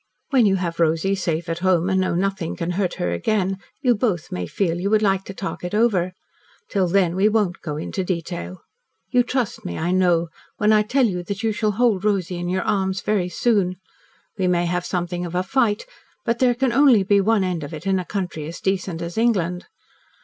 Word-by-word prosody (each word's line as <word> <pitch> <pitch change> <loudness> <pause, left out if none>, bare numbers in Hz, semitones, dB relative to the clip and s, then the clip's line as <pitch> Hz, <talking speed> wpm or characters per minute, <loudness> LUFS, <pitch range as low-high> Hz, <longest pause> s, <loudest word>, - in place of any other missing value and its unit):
When 250 -6 +5
you 195 - +3
have 170 -3 -3
Rosy 165 +4 +2
safe 170 -3 -2
at 165 0 -2
home, 180 -1 +2
and 190 -1 +2
know 185 - 0
nothing 190 -2 -1
can 170 0 -3
hurt 185 0 -1
her 90 - -2
again, 190 - 0 0.2
you 250 -2 +5
both 205 -7 -1
may 90 -1 -3
feel 175 - -1
you 195 +3 -1
would 215 0 +3
like 195 -1 +1
to 195 - -7
talk 195 - -5
it 180 +3 -3
over. 195 -6 +2 0.6
Till 195 -3 +1
then 180 -1 +2
we 200 +3 +4
won't 210 -5 0
go 150 -3 -4
into 185 +4 -3
detail. 175 0 -4 0.5
You 250 - +5
trust 245 -2 -2
me, 85 - -5
I 175 +2 -1
know, 175 -3 +2 0.3
when 210 +1 +3
I 215 - +5
tell 255 +5 +2
you 180 -5 -1
that 200 +3 -4
you 225 - +2
shall 210 0 0
hold 215 -3 +2
Rosy 190 -4 0
in 175 0 -3
your 185 +1 0
arms 190 -1 0
very 195 -4 0
soon. 195 -3 +1 0.6
We 185 - +2
may 175 -1 +2
have 180 +1 -1
something 175 -1 -2
of 175 0 -5
a 180 - +1
fight, 215 0 +1 0.4
but 230 0 0
there 250 -2 +3
can 260 -1 +1
only 255 -6 +5
be 200 +1 +3
one 215 0 +2
end 180 -3 -2
to 150 +2 -6
it 155 +4 -9
in 190 -1 +2
a - - -3
country 180 -6 -4
as 165 - -7
decent 190 -3 -2
as 170 +5 -4
England. 180 -7 +1
185 Hz, 220 wpm, -22 LUFS, 175-210 Hz, 0.6 s, When